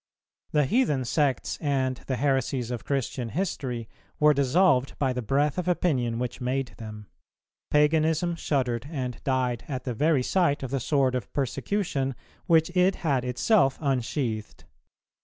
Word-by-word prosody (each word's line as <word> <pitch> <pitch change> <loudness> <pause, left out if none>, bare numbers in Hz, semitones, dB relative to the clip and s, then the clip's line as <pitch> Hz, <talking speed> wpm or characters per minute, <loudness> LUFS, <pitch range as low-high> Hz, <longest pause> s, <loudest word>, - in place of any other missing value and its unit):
The 150 -2 +2
heathen 150 - +1
sects 135 0 0
and 130 -3 0
the 130 - 0
heresies 130 -2 0
of 120 - -4
Christian 130 -3 -2
history 130 - -3 0.3
were 150 0 +6
dissolved 140 0 +2
by 135 -3 +1
the 125 - -3
breath 140 - +1
of 180 - -3
opinion 130 -10 +1
which 125 +1 -4
made 130 0 -1
them; 105 -2 -8 0.6
paganism 160 +3 +2
shuddered 130 -6 -1
and 130 -6 -4
died 125 -3 0
at 130 -3 -4
the 125 - -3
very 145 +2 +2
sight 155 -3 +1
of 130 - -4
the 135 - 0
sword 135 0 +1
of 125 -4 -3
persecution, 140 - -1 0.3
which 165 +1 +3
it 185 +1 +4
had 135 -5 +2
itself 135 - +2
unsheathed. 125 -5 -2
135 Hz, 145 wpm, -26 LUFS, 125-150 Hz, 0.6 s, were